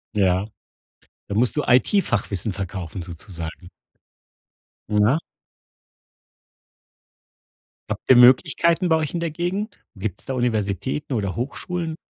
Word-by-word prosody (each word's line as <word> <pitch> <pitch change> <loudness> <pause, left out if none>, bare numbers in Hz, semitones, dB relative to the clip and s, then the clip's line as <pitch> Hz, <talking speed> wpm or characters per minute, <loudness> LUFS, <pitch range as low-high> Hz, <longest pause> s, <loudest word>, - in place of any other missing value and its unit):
Ja, 95 -1 +2 0.8
da 100 - -3
musst 120 +6 +1
du 150 - +2
IT-Fachwissen 120 - +2
verkaufen 95 -2 -5
sozusagen. 85 0 -8 1.2
Na. 105 +8 +3 2.7
Habt - - -5
ihr 130 - +8
Möglichkeiten 165 +8 +5
bei 160 - +5
euch 155 -2 -2
in 170 - -2
der 165 -2 -1
Gegend? 185 +7 -3 0.2
Gibt's 95 -1 -5
da 135 - -3
Universitäten 120 +3 -1
oder 100 -3 -2
Hochschulen? 160 +6 -3
120 Hz, 105 wpm, -23 LUFS, 100-155 Hz, 2.7 s, ihr